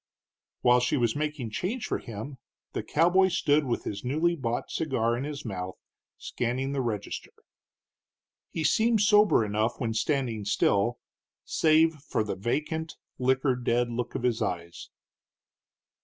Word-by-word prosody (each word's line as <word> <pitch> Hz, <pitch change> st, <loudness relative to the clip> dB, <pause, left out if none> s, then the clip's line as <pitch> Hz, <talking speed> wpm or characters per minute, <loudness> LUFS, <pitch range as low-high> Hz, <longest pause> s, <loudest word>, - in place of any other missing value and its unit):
While 125 Hz, 0 st, +5 dB
she 125 Hz, +4 st, +1 dB
was 120 Hz, -3 st, +1 dB
making 150 Hz, -6 st, -3 dB
change 205 Hz, -, -2 dB
for -, -, -2 dB
him, 120 Hz, +5 st, -8 dB, 0.3 s
the -, -, -2 dB
cowboy 175 Hz, +4 st, +3 dB
stood 150 Hz, -4 st, +2 dB
with 120 Hz, -2 st, -1 dB
his 100 Hz, -1 st, -5 dB
newly 155 Hz, +7 st, +1 dB
bought 120 Hz, -6 st, -3 dB
cigar 120 Hz, -7 st, 0 dB
in 125 Hz, +3 st, -3 dB
his 145 Hz, -2 st, -6 dB
mouth, 95 Hz, -3 st, -4 dB, 0.4 s
scanning 130 Hz, +3 st, -2 dB
the 140 Hz, -1 st, -1 dB
register. 110 Hz, -5 st, -4 dB, 1.2 s
He 160 Hz, -, -3 dB
seemed 220 Hz, +8 st, +3 dB
sober 210 Hz, -, +5 dB
enough 110 Hz, +3 st, -1 dB
when 115 Hz, -3 st, -1 dB
standing 115 Hz, -2 st, -1 dB
still, 100 Hz, +3 st, +2 dB, 0.5 s
save 160 Hz, +1 st, +4 dB
for 140 Hz, -6 st, -2 dB
the 105 Hz, -, -3 dB
vacant, 155 Hz, -, -2 dB, 0.2 s
liquor 130 Hz, +1 st, +2 dB
dead 120 Hz, 0 st, 0 dB
look 120 Hz, +1 st, -4 dB
of -, -, -3 dB
his 120 Hz, -3 st, +1 dB
eyes. 85 Hz, -1 st, -4 dB
125 Hz, 140 wpm, -28 LUFS, 115-155 Hz, 1.2 s, While